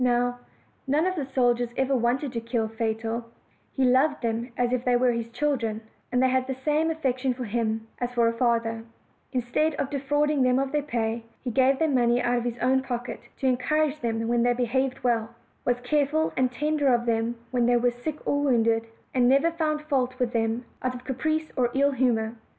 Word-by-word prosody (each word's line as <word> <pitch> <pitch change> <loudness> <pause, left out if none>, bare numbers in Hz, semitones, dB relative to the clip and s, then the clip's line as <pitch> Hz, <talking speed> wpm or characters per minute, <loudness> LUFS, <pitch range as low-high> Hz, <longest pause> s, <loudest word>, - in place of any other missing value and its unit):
Now, 245 0 +1 0.5
none 295 +5 +2
of 370 - +1
the 285 -6 -3
soldiers 245 -2 +1
ever 265 0 +2
wanted 250 +3 0
to 230 - -2
kill 230 -1 -1
Fatal; 225 +1 -2 0.5
he 265 - -1
loved 265 +3 +3
them 230 +2 -2
as 245 0 +1
if 250 -1 0
they 250 -1 +2
were 245 0 +3
his 230 -1 -3
children, 235 -4 -1 0.3
and 250 +1 +2
they 260 - +4
had 260 0 +1
the 265 - -2
same 310 +2 +2
affection 265 -5 -1
for 250 - -5
him 220 0 -2
as 245 0 -2
for 235 -1 +4
a 230 - +1
father: 230 -1 0 0.5
instead 265 +5 0
of 275 0 -3
de 280 - -1
frauding 290 +1 +1
them 255 0 +3
of 270 0 0
their 295 0 +1
pay, 230 -5 -2 0.2
he 250 - -2
gave 265 +3 +3
them 315 -2 +1
money 240 -1 +3
out 245 0 +1
of 240 - -5
his 240 -1 -2
own 265 +1 +3
pocket, 245 -2 -4 0.2
to - - -4
encourage 295 +4 +1
them 225 -2 -2
when 240 0 +2
they 245 +1 +3
behaved 255 +2 -1
well; 235 -2 0 0.3
was 245 0 +1
careful 295 +4 +1
and 255 -1 +1
tender 300 +2 0
of 240 -1 +2
them 230 0 0 0.2
when 245 -2 +2
they 245 0 +4
were 245 +1 +2
sick 265 +6 -5
or 285 - +1
wounded; 230 -4 +2 0.3
and 250 -1 +4
never 280 +6 +4
found 310 -2 -1
fault 260 -4 0
with 250 -2 -1
them 225 +1 0 0.2
out 255 0 -2
of 245 - -9
caprice 310 +5 -2
or 245 -3 +2
ill 280 +1 +3
humor. 235 -4 +1
250 Hz, 210 wpm, -26 LUFS, 235-275 Hz, 0.5 s, they